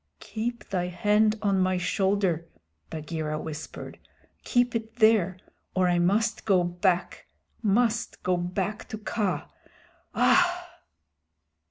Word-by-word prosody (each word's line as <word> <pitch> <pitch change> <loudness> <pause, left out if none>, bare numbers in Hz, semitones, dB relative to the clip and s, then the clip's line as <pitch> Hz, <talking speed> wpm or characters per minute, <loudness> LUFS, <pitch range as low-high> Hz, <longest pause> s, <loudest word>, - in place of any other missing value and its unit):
"Keep 230 0 -4
thy 180 -3 -1
hand 210 +4 +2
on 200 -2 +2
my 185 0 +2
shoulder," 185 -2 0 0.4
Bagheera 155 -1 -4
whispered. 155 0 -7 0.4
"Keep 245 -1 +2
it 225 0 -4
there, 215 -5 +4 0.4
or 185 -1 +3
I 175 -1 +2
must 210 +6 +1
go 190 -4 +3
back 175 +1 -1 0.3
must 230 +2 +1
go 185 0 +2
back 185 +4 -3
to 220 - -5
Kaa. 205 -6 -2 0.7
Aah!" - - +3
190 Hz, 115 wpm, -27 LUFS, 175-220 Hz, 0.7 s, there